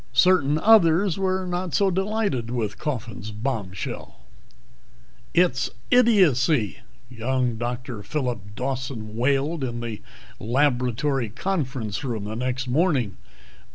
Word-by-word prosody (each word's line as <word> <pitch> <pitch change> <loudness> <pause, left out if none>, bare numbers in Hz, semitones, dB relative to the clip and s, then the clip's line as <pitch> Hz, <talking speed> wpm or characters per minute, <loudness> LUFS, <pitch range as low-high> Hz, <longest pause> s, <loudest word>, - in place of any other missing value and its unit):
Certain 150 0 +4
others 195 -1 +5
were 190 -1 0
not 180 -1 -2
so 195 -2 +3
delighted 190 - -1
with 115 -4 -3
Coffin's 115 -8 -4
bombshell. 105 -4 -4 1.2
"It's 150 -8 +2 0.2
idiocy!" 160 - +4 0.3
young 125 0 -1
Dr. 120 -1 -4
Phillip 105 -4 -3
Dawson 125 -4 -4
wailed 140 +5 +1
in 120 -2 -3
the 115 -3 -5 0.4
laboratory 125 0 +1
conference 130 - -3
room 115 -6 -3
the 105 +2 -5
next 125 +2 -2
morning. 130 - +1
130 Hz, 105 wpm, -24 LUFS, 115-165 Hz, 1.2 s, others